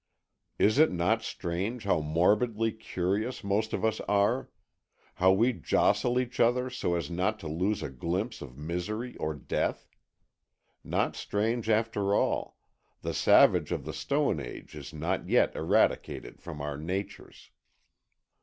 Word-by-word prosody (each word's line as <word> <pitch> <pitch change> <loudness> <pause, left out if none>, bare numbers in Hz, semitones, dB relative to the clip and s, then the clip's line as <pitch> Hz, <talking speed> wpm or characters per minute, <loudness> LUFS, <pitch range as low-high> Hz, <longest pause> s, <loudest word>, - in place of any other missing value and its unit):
Is 110 +7 +3
it 155 - +6
not 90 +6 +1
strange 100 +6 -3
how 100 -6 +2
morbidly 105 +9 +2
curious 105 +2 -2
most 105 +2 0
of - - -1
us 110 -1 0
are? 105 +5 +2 0.6
How 95 +1 +4
we 115 +6 +3
jostle 125 +2 +2
each 125 -1 -4
other 125 +2 +3
so 90 -8 -1
as 85 -2 -3
not 95 +5 0
to 80 - -6
lose 90 +7 -1
a - - -3
glimpse 90 - -3
of 65 -2 -10
misery 90 - -4
or 80 0 -2
death? 70 - -2 1.0
Not - - 0
strange, 110 +2 -1
after 105 -2 +1
all - - 0 0.5
the - - -2
savage - - +5
of - - -2
the - - -5
stone 140 - 0
age 65 -4 -8
is - - -8
not 85 +4 -3
yet - - +3
eradicated - - 0
from 80 -4 -7
our 75 -1 -4
natures. 95 +6 -6
100 Hz, 145 wpm, -29 LUFS, 85-115 Hz, 1.0 s, it